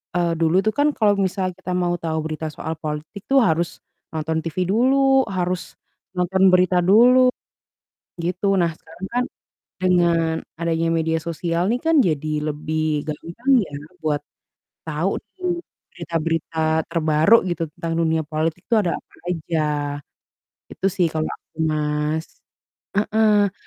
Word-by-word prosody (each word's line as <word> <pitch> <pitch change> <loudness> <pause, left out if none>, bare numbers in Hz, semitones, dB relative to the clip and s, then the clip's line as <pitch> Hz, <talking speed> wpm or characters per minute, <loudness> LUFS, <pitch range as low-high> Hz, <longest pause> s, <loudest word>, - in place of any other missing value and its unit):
eee, 170 -1 +2
dulu 165 +1 +2
tuh 215 - +2
kan 290 - +5
kalau 210 -2 +4
misal 185 0 -1
kita 185 -1 -6
mau 175 0 +1
tahu 160 -1 -1
berita 160 0 -3
soal 160 - -4
politik 155 +6 -5
tuh 270 0 +6
harus 165 +1 -1 0.3
nonton 160 +1 -1
TV 165 0 -6
dulu, 265 +4 +4
harus 180 0 -2 0.4
nonton 185 +1 +1
berita 180 0 +4
dulu, 235 +8 +6 1.0
gitu. 180 +3 -2 0.2
Nah, 170 - +2
sekarang 165 +4 -9
kan 245 - +2 0.6
dengan 170 -3 +3 0.3
adanya 165 0 0
media 160 0 +1
sosial 170 +1 -2
nih 245 - 0
kan, 325 - +4
jadi 155 -1 -1 0.2
lebih 155 0 -1
gampang 170 - -3
ya 145 - -13 0.3
buat 150 -2 0 0.7
tahu 160 +4 0 0.3
nih 360 -2 -2 0.3
berita-berita 165 0 -3 0.3
terbaru 160 +4 +4
gitu, 175 -1 -3
tentang 165 0 -3
dunia 160 -1 +1
politik 155 +1 -2
itu 235 - +2
ada 180 -5 +1
apa - - -31
aja. 165 -1 -2 1.1
Itu 195 - -3
sih 180 -3 +3
kalau 155 0 -1
aku, - - -44
Mas. 150 +1 -1 0.7
Heeh. 210 -1 +3
170 Hz, 135 wpm, -22 LUFS, 160-190 Hz, 1.1 s, tuh